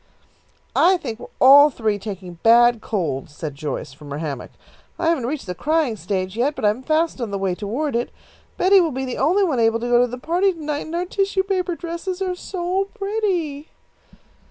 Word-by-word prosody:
"I 370 +1 +5
think 240 -9 -6
we - - -8
are - - -15
all 285 +3 +8
three 220 -6 -1
taking 190 -4 -8
bad 235 0 +5
colds," 150 -8 -3
said 155 -2 -5
Joyce, 140 -3 -5
from 145 +1 -13
her 140 - -4
hammock. 150 -5 -5 0.5
"I 330 - +1
haven't 280 -8 0
reached 295 +2 -4
the 180 - -4
crying 300 - 0
stage 190 0 -3
yet, 270 +6 0
but 250 - -3
I'm 210 +4 +2
fast 315 0 0
on 235 - -2
the 200 - -3
way 190 -2 -1
toward 235 +9 -3
it. 240 +1 -1 0.5
Betty 380 +1 +5
will 335 - +1
be 265 -1 -3
the 255 - -4
only 355 +9 +3
one 305 -10 +1
able 225 0 +3
to 240 - -3
go 240 0 +5
to 250 - +3
the 250 +1 -6
party 355 +8 +1
to 335 - -14
night, 295 0 -3
and 325 - -5
our 350 +1 -1
tissue 390 0 0
paper 370 -2 -1
dresses 340 +2 -5
are 375 -1 -1
so 365 +1 -2
pretty." 385 -9 -2
265 Hz, 210 wpm, -21 LUFS, 210-345 Hz, 0.5 s, all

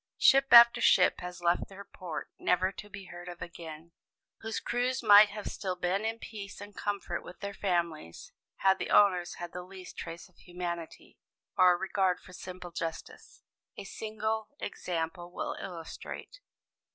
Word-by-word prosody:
Ship 275 0 +6
after 235 0 +9
ship 180 - +5
has 180 -1 -7
left 170 0 +1
her 200 +1 -10
port, 180 -5 -7
never 185 +1 +2
to 205 +2 -10
be 200 -1 -9
heard 175 0 -9
of 175 -1 -9
again, 165 -1 -9 0.5
whose 225 0 -3
crews 245 +1 -1
might 210 -1 +9
have 210 0 -7
still 185 -2 -3
been 180 +4 -1
in 225 +1 -1
peace 205 -3 -8
and 205 0 -10
comfort 200 -4 -3
with 180 - -11
their 200 0 -5
families, 170 - -2 0.3
had 190 0 +4
the - - -3
owners 180 -4 +4
had 175 -1 -7
the 180 - -5
least 185 0 -11
trace 165 0 -7
of 185 - -29
humanity, 175 -2 -7 0.4
or 180 -1 +6
regard 190 -1 +1
for 180 - -15
simple 180 -1 -8
justice. 165 -1 -7 0.3
A - - -6
single 220 +1 -3
example 175 -1 -4
will - - -3
illustrate. 175 - -8
185 Hz, 160 wpm, -30 LUFS, 175-205 Hz, 0.5 s, after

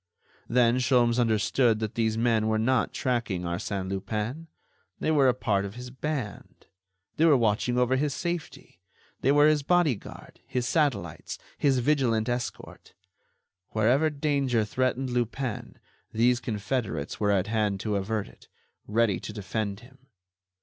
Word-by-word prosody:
Then 120 0 +3
Sholmes 125 -2 +3
understood 115 +1 +2
that 110 0 -3
these 110 -1 0
men 115 -2 +2
were 110 0 +1
not 125 +3 +1
tracking 120 -8 -1
Arsène 95 +2 -3
Lupin; 105 - -4 0.5
they - - 0
were 140 -4 +4
a - - +3
part 100 -5 0
of 100 +2 -6
his 125 0 -8
band. 130 -6 -5 0.5
They 160 - +4
were 150 -4 +6
watching 115 +2 +1
over 125 +1 +3
his 145 +2 0
safety. 170 +3 -5 0.4
They 135 - +3
were 145 +1 +5
his 155 -1 +3
bodyguard, 155 - -1
his 125 -1 -2
satellites, 125 - -1 0.2
his 140 -3 +2
vigilant 120 -4 +1
escort. 120 0 -5 0.8
Wherever 125 +9 +3
danger 140 -6 0
threatened 130 +3 -1
Lupin, 120 0 -3 0.3
these 120 +2 +3
confederates 105 - -3
were 105 - +1
at 100 -2 +2
hand 105 -3 0
to 105 -2 -1
avert 105 +1 -2
it, - - -18 0.4
ready 110 -2 +2
to - - -7
defend 105 0 -4
him. 130 +2 -19
120 Hz, 145 wpm, -27 LUFS, 105-130 Hz, 0.8 s, were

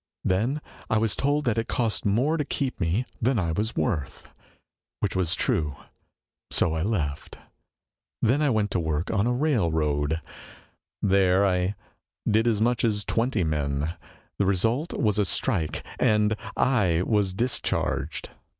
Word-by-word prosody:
Then 115 +11 +1 0.3
I 110 - +3
was 110 -1 +1
told 145 +2 +1
that 115 -2 +1
it 115 - -2
cost 115 -4 0
more 125 +10 +2
to 155 - 0
keep 135 -2 -3
me 95 +7 0 0.2
than 125 +2 +2
I 85 -5 0
was 105 +7 -2
worth; 80 - -2 0.7
which - - -1
was 95 -1 +1
true. 75 -5 0 0.7
So 80 - +2
I 80 - -1
left. 80 -8 -2 0.8
Then 130 +7 +2
I 150 - +3
'went 110 -4 +1
to 95 - +1
\vork 80 +1 -1
on 105 +1 +1
a - - +2
railroad. 80 - +1 0.8
There 95 -1 +4
I 90 +1 +1 0.5
did 110 +2 +3
as 110 -3 +2
much 120 +2 +1
as 105 -3 +1
twenty 115 -4 +1
men. 75 0 -1 0.5
The 100 - +2
result 115 - +1
was 105 -2 +1
a - - +4
strike, 95 - -1 0.2
and 105 0 +3 0.2
I 95 -10 +2
was 100 -4 +1
discharged." 120 +5 -1
105 Hz, 150 wpm, -26 LUFS, 85-120 Hz, 0.8 s, There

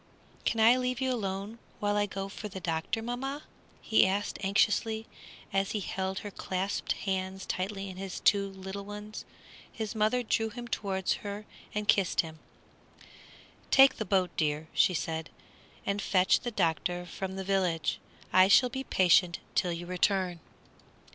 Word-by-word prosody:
"Can 225 - +1
I 230 +3 +7
leave 255 0 -1
you 260 -1 +1
alone 200 0 -4 0.2
while 205 0 +1
I 205 0 +2
go 195 0 -4
for 210 +2 -7
the 195 -2 -7
doctor, 170 +6 -2
mamma?" 270 +5 -4 0.4
he 220 - +5
asked, 200 +2 -1
anxiously, 220 +3 +2 0.5
as 195 0 +1
he 215 - 0
held 190 0 -3
her 205 - -5
clasped 190 +1 -2
hands 190 -1 -3
tightly 195 +1 -3
in 185 -1 -8
his 195 -1 -5
two 200 -2 +3
little 190 +1 -7
ones. 210 +1 -8 0.5
His 220 -1 -4
mother 220 +3 +2
drew 225 0 +1
him 240 +2 -7
towards 190 -5 -1
her 205 +1 -6 0.3
and 210 0 -2
kissed 195 -3 +3
him. 160 -1 -10 1.3
"Take 270 0 +7
the 220 - -1
boat, 190 -3 +1
dear," 155 0 0
she 180 - +4
said, 160 0 -3 0.6
"and 200 +1 -1
fetch 185 -1 +3
the 240 - -3
doctor 175 -3 0
from 190 +2 -5
the 190 - -4
village. 185 -4 0 0.3
I 185 0 +7
shall 250 +5 +6
be 265 +2 -4
patient 180 -5 +4 0.2
till 180 -2 +1
you 170 +1 -4
return." 180 0 +1
195 Hz, 160 wpm, -30 LUFS, 185-215 Hz, 1.3 s, I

